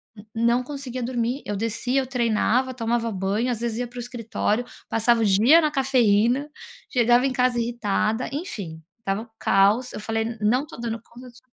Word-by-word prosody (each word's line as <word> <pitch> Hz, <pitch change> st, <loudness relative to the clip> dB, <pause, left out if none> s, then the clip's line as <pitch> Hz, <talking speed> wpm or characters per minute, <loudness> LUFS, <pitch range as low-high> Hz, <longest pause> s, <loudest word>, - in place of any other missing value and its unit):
n 205 Hz, -, -13 dB
não 235 Hz, +2 st, +2 dB
conseguia 255 Hz, -2 st, -6 dB
dormir, 245 Hz, +2 st, -2 dB
eu 205 Hz, -, -3 dB
descia, 230 Hz, +5 st, -1 dB
eu 260 Hz, -, -6 dB
treinava, 250 Hz, +1 st, +1 dB
tomava 230 Hz, -1 st, -1 dB
banho, 200 Hz, +5 st, -1 dB
às 230 Hz, -, -3 dB
vezes 235 Hz, -2 st, -2 dB
ia 245 Hz, 0 st, -2 dB
para 245 Hz, -, -14 dB
o -, -, -3 dB
escritório, 240 Hz, -1 st, -2 dB, 0.2 s
passava 230 Hz, +1 st, +2 dB
o -, -, +3 dB
dia 220 Hz, -, +6 dB
na 305 Hz, -, +2 dB
cafeína, 255 Hz, -1 st, +2 dB, 0.4 s
chegava 245 Hz, 0 st, +4 dB
em 265 Hz, -, -1 dB
casa 250 Hz, -1 st, +1 dB
irritada, 230 Hz, 0 st, -1 dB
enfim, 200 Hz, -, -6 dB, 0.2 s
estava 195 Hz, -1 st, -2 dB
um 230 Hz, -, -11 dB
caos, 205 Hz, +6 st, +3 dB
eu -, -, -5 dB
falei: 225 Hz, +1 st, -2 dB
"Não 240 Hz, +6 st, +2 dB
estou 300 Hz, -5 st, -11 dB
dando 230 Hz, -1 st, -3 dB
conta 245 Hz, +2 st, -14 dB
dis" 240 Hz, -, -18 dB
235 Hz, 185 wpm, -24 LUFS, 220-250 Hz, 0.4 s, dia